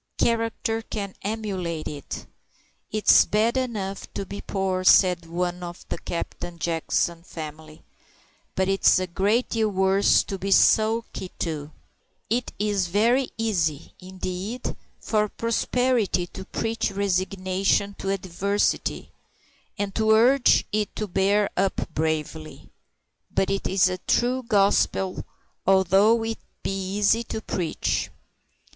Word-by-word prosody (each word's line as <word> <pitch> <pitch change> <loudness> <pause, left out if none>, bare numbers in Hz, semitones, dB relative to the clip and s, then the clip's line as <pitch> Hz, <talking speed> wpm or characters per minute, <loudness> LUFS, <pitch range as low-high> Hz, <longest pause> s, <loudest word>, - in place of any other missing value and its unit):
Character 225 -1 0
can 200 -3 -5
emulate 190 -6 -3
it. 145 -2 -6 0.7
"It's 215 0 +6
bad 220 +3 +1
enough 210 -7 -3
to 195 - -3
be 200 +2 -7
poor," 190 -2 -2
said 180 -2 +5
one 175 +1 -2
of 175 0 -8
the - - -3
Captain 175 0 -5
Jackson 165 +1 -1
family, 155 -2 -9 0.7
"but 190 0 +1
it's 195 0 +4
a 185 - 0
great 200 +7 +1
deal 220 -1 +1
worse 190 0 +3
to 195 - -6
be 195 - -3
sulky 220 -1 +3
too." 155 -3 -3 0.6
It 245 +2 0
is 205 -3 0
very 235 +8 +2
easy, 170 -10 -1
indeed, 185 +5 -5 0.2
for 210 -1 0
prosperity 230 -4 0
to 190 +2 -9
preach 225 +2 -2
resignation 195 0 0
to 195 - -3
adversity, 195 +1 -1 0.7
and 200 -1 -2
to 220 0 +1
urge 245 +4 +5
it 210 0 -1
to 215 - -2
bear 200 +2 +2
up 195 +1 -1
bravely. 155 0 -3 0.6
But 190 - 0
it 195 - -1
is 190 -1 +3
a 185 0 -3
true 250 +6 +1
gospel, 200 -4 +1 0.4
although 195 +4 +4
it 225 0 -3 0.2
be - - -1 0.2
easy 210 +3 +3
to 220 - -4
preach. 180 -6 -2
195 Hz, 125 wpm, -25 LUFS, 180-220 Hz, 0.7 s, It's